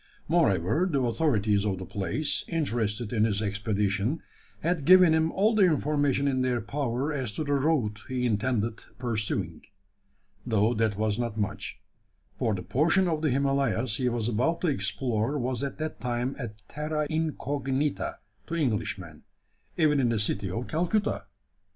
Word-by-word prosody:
Moreover, 155 - +2
the 140 - +2
authorities 110 -6 +2
of 100 -3 0
the 95 - -6
place, 100 - -2
interested 120 - -1
in 110 -2 +3
his 105 -2 +1
expedition, 105 +4 0 0.4
had 165 -2 0
given 180 0 +7
him 160 0 +2
all 215 +4 +2
the 215 - +3
information 145 -5 +2
in 130 -2 +1
their 125 -1 +1
power 135 +4 -2
as 130 -7 -2
to - - -1
the 145 -1 -1
route 135 -7 +1
he 125 -1 -1
intended 115 0 0 0.2
pursuing 115 -4 -2 0.8
though 110 -1 +2
that 110 -3 0
was 110 0 0
not 115 -2 -2
much: 105 -2 -3 0.6
for 110 - 0
the 90 - -5
portion 170 - +2
of 160 -3 0
the 155 - +2
Himalayas 135 -4 +1
he 125 -2 +1
was 115 -2 -1
about 125 +9 +1
to 175 - +2
explore 115 +2 0
was 125 -2 -2
at 140 - -3
that 155 0 -4
time 125 +2 -2
a 120 - -3 0.2
terra 150 0 -2
incognita 145 -3 -1 0.3
to 170 - -3
Englishmen 105 - -2 0.5
even 150 -3 +4
in 125 -3 +3
the 115 - +1
city 100 -1 -1
of 115 +7 -3
Calcutta! 175 +6 0
125 Hz, 155 wpm, -28 LUFS, 110-150 Hz, 0.8 s, given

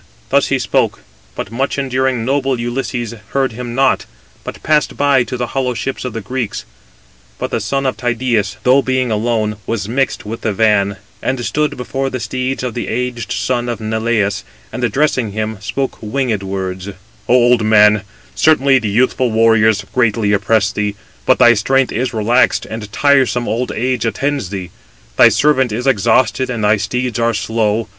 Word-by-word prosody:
Thus - - +3
he - - +1
spoke: - - 0 0.3
but 100 - -5
much 135 +5 -2
enduring, 130 -3 0
noble 135 -1 0
Ulysses 120 -1 -3 0.2
heard 135 -2 +1
him 120 +1 -6
not, 135 0 +2 0.4
but - - -8
passed 150 -1 +1
by 140 -3 +3
to 125 +2 -5
the 120 - -1
hollow 130 -2 -1
ships 135 +3 -4
of 125 - -4
the 115 - -4
Greeks. 120 +1 -4 0.7
But - - -4
the - - 0
son 135 0 -2
of 130 - -1
Tydeus, 120 -4 -1
though 130 +2 +5
being 130 -2 0
alone, 110 -1 0
was 110 -4 -2
mixed 130 +1 -1
with 115 +2 -6
the 110 - -1
van, 100 -2 +2 0.2
and 130 -2 -2
stood 150 0 -1
before 135 +2 -3
the 130 - -4
steeds 130 +4 -3
of 125 -2 -3
the 120 - -4
aged 120 -2 -3
son 120 -1 -1
of 120 - -3
Neleus, 110 -2 -1 0.3
and 125 - -4
addressing 120 -2 0
him, 110 -1 -3
spoke 135 +6 -3
winged 115 -1 -1
words: 95 -1 -4 0.4
"O 125 - +5
old 120 -2 +4
man, 105 -1 +5 0.3
certainly 140 -4 +4
the 110 -4 -3
youthful 125 +3 +1
warriors 110 -1 +3
greatly 110 -4 +2
oppress 105 0 +2
thee: 105 -1 -2 0.3
but - - +5
thy 120 - +7
strength 135 +4 +1
is 125 +2 -1
relaxed, 115 +2 +2
and 110 -2 -7
tiresome 130 -2 +2
old 120 +3 -1
age 125 +1 -1
attends 135 -4 -2
thee: 95 -3 -6 0.5
thy - - +8
servant 135 -5 +2
is 120 +4 -3
exhausted, 120 0 +2
and 120 -4 -3
thy 105 +1 +4
steeds 125 +4 -2
are 115 -1 +1
slow. 110 0 0
120 Hz, 175 wpm, -16 LUFS, 110-130 Hz, 0.7 s, thy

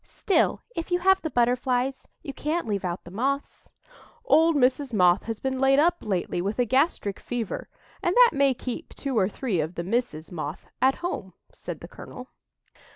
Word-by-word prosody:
Still, 395 - 0
if 330 - -4
you 355 - +2
have 380 +1 +3
the 320 - -3
Butterflies, 250 +1 0 0.2
you 275 - -6
can't 310 +4 -2
leave 200 -2 -1
out 175 -1 -3
the 175 - -12
Moths." 275 +7 -3 0.5
"Old 325 -6 +5
Mrs. 260 -1 +2
Moth 180 -1 +4
has 225 -2 -4
been 265 -1 -2
laid 270 +1 +4
up 345 +4 +4
lately 180 -3 -2
with 200 +4 -2
a 245 - +2
gastric 260 - +1
fever, 240 -4 -4 0.3
and 350 - 0
that - - +7
may 275 -2 +3
keep 250 +7 -6
two 275 -2 -3
or 195 -3 +3
three 215 -5 -2
of 160 +3 -2
the 170 - -3
Misses 195 -6 -2
Moth 155 -1 -5 0.2
at 265 +1 +4
home," 195 - -4 0.2
said - - -7
the - - -8
colonel. - - -10
250 Hz, 185 wpm, -26 LUFS, 200-285 Hz, 0.5 s, that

